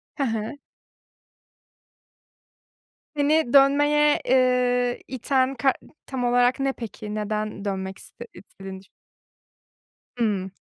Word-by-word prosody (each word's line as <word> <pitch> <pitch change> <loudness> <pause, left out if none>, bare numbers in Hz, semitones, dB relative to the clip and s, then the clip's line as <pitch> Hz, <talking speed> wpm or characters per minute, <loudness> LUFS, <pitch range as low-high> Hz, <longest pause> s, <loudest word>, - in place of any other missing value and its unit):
Hı 280 - -1
hı. 225 +2 -3 2.6
Seni 295 -2 +2
dönmeye, 290 +2 +4
ııı, 250 -1 +2
iten 260 +1 0
kar 270 0 +2 0.3
tam 260 -2 -4
olarak 245 +2 +2
ne 270 0 0
peki? 215 -2 -7
Neden 210 -1 -3
dönmek 190 -1 -4
iste 235 - -12
istedin? 190 -1 -11 1.4
Hımm. 200 -5 -1
245 Hz, 90 wpm, -24 LUFS, 215-270 Hz, 2.6 s, dönmeye